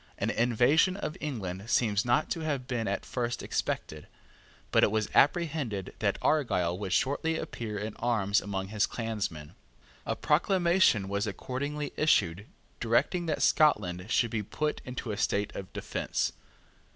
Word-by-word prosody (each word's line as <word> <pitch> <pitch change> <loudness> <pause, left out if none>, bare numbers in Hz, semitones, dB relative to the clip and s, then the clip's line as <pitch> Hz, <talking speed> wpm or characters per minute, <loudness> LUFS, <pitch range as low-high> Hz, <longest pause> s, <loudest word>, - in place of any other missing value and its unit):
An - - 0
invasion 125 - +3
of 155 - -4
England 105 -8 -4
seems 110 -4 +2
not 120 +5 +2
to 170 - -1
have 145 -5 -2
been 120 -4 -2
at 100 0 -2
first 120 -1 -3
expected; 75 -1 -3 0.6
but - - +4
it - - +5
was 110 0 0
apprehended 145 - +1
that - - +1
Argyle 90 - +2
would 100 -3 -4
shortly 145 - +1
appear 115 -10 -5
in 105 +1 -4
arms 105 -4 +1
among 95 -1 -4
his 105 0 +1
clansmen. 105 -10 -4 0.5
A - - 0
proclamation 170 - +3
was 100 +2 -1
accordingly 140 +7 -4
issued 100 - +2 0.3
directing 140 +9 +1
that 155 - 0
Scotland 100 - +3
should 120 -2 +2
be 110 -2 -1
put 150 +9 -2
into 125 -2 -5
a 100 - -4
state 105 0 0
of 95 - -7
defence. - - -2
115 Hz, 150 wpm, -29 LUFS, 100-150 Hz, 0.6 s, it